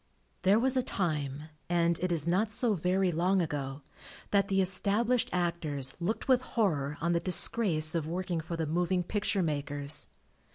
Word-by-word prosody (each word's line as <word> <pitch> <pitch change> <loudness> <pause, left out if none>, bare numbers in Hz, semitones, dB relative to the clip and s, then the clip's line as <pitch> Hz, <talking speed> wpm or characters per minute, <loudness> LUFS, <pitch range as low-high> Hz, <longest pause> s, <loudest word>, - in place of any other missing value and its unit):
There 195 +3 +4
was 260 +3 +2
a 255 - +3
time, 150 - -2 0.3
and 170 -1 +2
it 180 0 -1
is 165 -2 0
not 200 +5 +1
so 225 +1 +1
very 185 +1 +1
long 180 +4 +1
ago, 145 -4 -3 0.5
that 200 -1 +3
the 195 0 +1
established 205 +6 +2
actors 160 -6 -1
looked 185 +6 -2
with 255 -2 +4
horror 150 - -1
on 170 +2 +1
the 170 - +2
disgrace 175 -3 +2
of 165 -3 -1
working 175 0 -2
for 165 +1 -5
the 165 - -1
Moving 175 +3 0
Picture 200 0 -1
makers. 145 -1 -1
175 Hz, 165 wpm, -30 LUFS, 155-195 Hz, 0.5 s, There